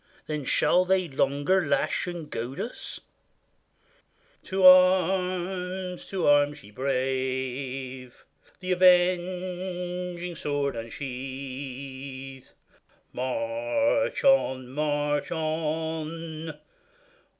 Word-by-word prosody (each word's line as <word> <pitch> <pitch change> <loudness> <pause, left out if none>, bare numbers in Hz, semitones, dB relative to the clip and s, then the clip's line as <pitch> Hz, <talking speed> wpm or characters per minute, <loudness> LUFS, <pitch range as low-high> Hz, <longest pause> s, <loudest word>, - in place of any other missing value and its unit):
Then 150 -3 -4
shall 180 +7 +3
they 185 -1 +2
longer 145 +6 +1
lash 145 - +1
and 175 -3 -5
goad 120 +2 -5
us? 240 - -6 1.4
To 190 0 +1
arms! 185 0 +4
to 190 -3 -2
arms! 145 0 +3
ye 105 - -14
brave! 130 0 -3 0.4
The 185 0 -3
avenging 180 0 +1
sword 145 -3 -1
unsheathe; 130 +2 -7 0.7
March 285 - 0
on! 130 - +3
march 145 +1 -1
on 160 0 -3
155 Hz, 75 wpm, -27 LUFS, 135-180 Hz, 1.4 s, arms